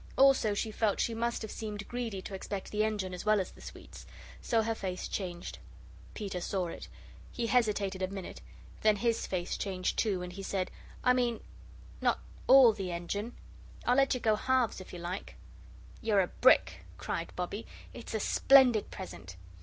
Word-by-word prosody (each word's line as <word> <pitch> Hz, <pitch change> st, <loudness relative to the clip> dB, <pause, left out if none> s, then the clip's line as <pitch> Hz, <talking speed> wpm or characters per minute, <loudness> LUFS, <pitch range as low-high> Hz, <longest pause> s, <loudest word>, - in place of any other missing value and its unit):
Also 265 Hz, -6 st, +5 dB
she 220 Hz, +2 st, -2 dB
felt 215 Hz, -1 st, 0 dB
she 230 Hz, -, +1 dB
must 235 Hz, +1 st, -1 dB
have 220 Hz, -, -6 dB
seemed 210 Hz, -2 st, -5 dB
greedy 230 Hz, -6 st, -4 dB
to -, -, -7 dB
expect 195 Hz, 0 st, -5 dB
the 215 Hz, 0 st, +1 dB
engine 205 Hz, -4 st, -1 dB
as 180 Hz, -, -5 dB
well 215 Hz, 0 st, +4 dB
as 185 Hz, -, -3 dB
the -, -, -16 dB
sweets. -, -, -11 dB, 0.3 s
So 225 Hz, -2 st, +2 dB
her 225 Hz, +1 st, 0 dB
face 185 Hz, -4 st, -4 dB
changed. 175 Hz, -3 st, -5 dB, 0.6 s
Peter 195 Hz, -4 st, -4 dB
saw 180 Hz, -1 st, -1 dB
it. -, -, -8 dB, 0.4 s
He 240 Hz, -, -2 dB
hesitated 210 Hz, -5 st, +1 dB
a 185 Hz, -, +1 dB
minute; 195 Hz, -1 st, -7 dB, 0.4 s
then 215 Hz, -1 st, +5 dB
his 230 Hz, +2 st, 0 dB
face 180 Hz, -2 st, -2 dB
changed, 185 Hz, -2 st, -2 dB
too, 195 Hz, -5 st, +1 dB
and 180 Hz, 0 st, -7 dB
he 195 Hz, -, -7 dB
said: 190 Hz, -1 st, -2 dB, 0.3 s
"I 250 Hz, -, +5 dB
mean 240 Hz, -3 st, +1 dB, 0.6 s
not -, -, +2 dB, 0.3 s
ALL 260 Hz, -3 st, +8 dB
the 195 Hz, -4 st, -4 dB
engine. 200 Hz, +7 st, -4 dB, 0.5 s
I'll 245 Hz, -, +3 dB
let 270 Hz, -1 st, +4 dB
you -, -, -2 dB
go 220 Hz, -2 st, +3 dB
halves 250 Hz, -3 st, +1 dB
if 185 Hz, -, -11 dB
you -, -, -7 dB
like." 175 Hz, +3 st, -5 dB, 0.7 s
"You're 210 Hz, -3 st, +3 dB
a 180 Hz, -, -1 dB
brick," 255 Hz, -, +4 dB
cried -, -, -4 dB
Bobbie; -, -, -4 dB, 0.3 s
"it's -, -, -7 dB
a -, -, +1 dB
splendid 260 Hz, -6 st, +5 dB
present." 90 Hz, -, -8 dB
210 Hz, 180 wpm, -31 LUFS, 185-230 Hz, 0.7 s, ALL